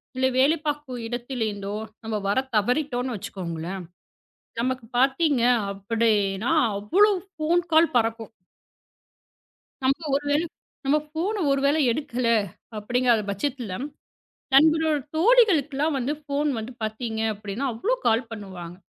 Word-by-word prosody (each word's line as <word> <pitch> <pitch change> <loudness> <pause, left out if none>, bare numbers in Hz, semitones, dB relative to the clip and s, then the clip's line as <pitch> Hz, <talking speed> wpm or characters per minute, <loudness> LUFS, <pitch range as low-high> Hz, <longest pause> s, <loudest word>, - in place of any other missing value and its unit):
இல்ல 260 0 +2
வேலை 290 +5 +5
பார்க்குற 295 -4 -3
இடத்துல 245 +1 -5
இருந்தோ, 200 0 -5 0.3
நம்ம 220 -1 -3
வரத் 260 +6 0
தவறிட்டோம்னு 250 +1 0
வச்சுக்கோங்களேன், 185 -2 -5 0.8
நமக்கு 255 -1 -1
பாத்தீங்க 270 0 +3 0.3
அப்படின்னா 210 +2 0 0.3
அவ்ளோ 385 - +4 0.2
ஃபோன் 320 +3 +2
கால் 320 +1 +5
பறக்கும். 225 -1 0 1.5
நம்ம 275 +3 +2
ஒரு 285 +1 0
வேளை 310 +4 +2 0.4
நம்ம 290 +3 +3
ஃபோன் 345 +8 -2
ஒருவேளை 280 +2 +2
எடுக்கல 245 -2 -1 0.5
அப்படிங்கிற 240 +1 +2
பட்சத்துல, 235 -1 -3 0.8
நம்மளோட 315 +2 +5 0.2
தோழிகளுக்குலாம் 320 - +3
வந்து 265 +3 -1
ஃபோன் 290 +1 -1
வந்து 225 +3 -5
பாத்தீங்க 220 +1 -3
அப்படின்னா 210 +5 -5
அவ்வளோ 320 - -1
கால் 225 +1 +2
பண்ணுவாங்க. 185 -5 -8
255 Hz, 110 wpm, -25 LUFS, 220-295 Hz, 1.5 s, வேலை